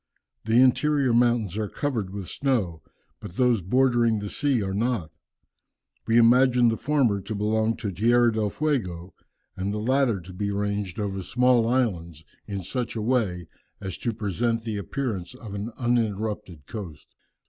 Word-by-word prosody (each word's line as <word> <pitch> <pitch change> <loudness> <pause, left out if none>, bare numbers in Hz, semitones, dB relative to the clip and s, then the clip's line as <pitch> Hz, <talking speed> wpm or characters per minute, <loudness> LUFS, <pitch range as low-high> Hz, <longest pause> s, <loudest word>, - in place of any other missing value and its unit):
The 110 +2 +4
interior 130 0 +3
mountains 120 -5 +2
are 105 -2 -2
covered 120 -10 -2
with 100 -1 -6
snow, 110 - -1 0.4
but 85 - -10
those 125 -5 +3
bordering 120 +2 +2
the 105 0 -4
sea 135 -7 +1
are 95 0 -3
not. 110 -6 -1 1.0
We 115 - +3
imagined 120 0 +5
the - - 0
former 130 -9 +1
to 105 +3 -5
belong 110 +2 0
to 110 -4 -3
Tierra 120 +5 +3
del 110 -1 0
Fuego, 95 - -2 0.4
and 95 +2 -2
the 105 - -2
latter 125 -1 +1
to 90 +2 -11
be 100 +3 -2
ranged 100 -1 -2
over 100 -2 -2
the - - -3
small 125 +1 +3
islands 90 -11 -1 0.2
in 100 -2 -4
such 120 +7 -3
a - - -2
way 105 -8 0 0.3
as 95 -3 -5
to 120 - -1
present 115 +2 -1
the 110 -2 -3
appearance 110 -2 -4
of 115 -5 -9
an 100 +3 -4
uninterrupted 105 - -1
coast." 90 -8 -8
110 Hz, 160 wpm, -25 LUFS, 100-120 Hz, 1.0 s, imagined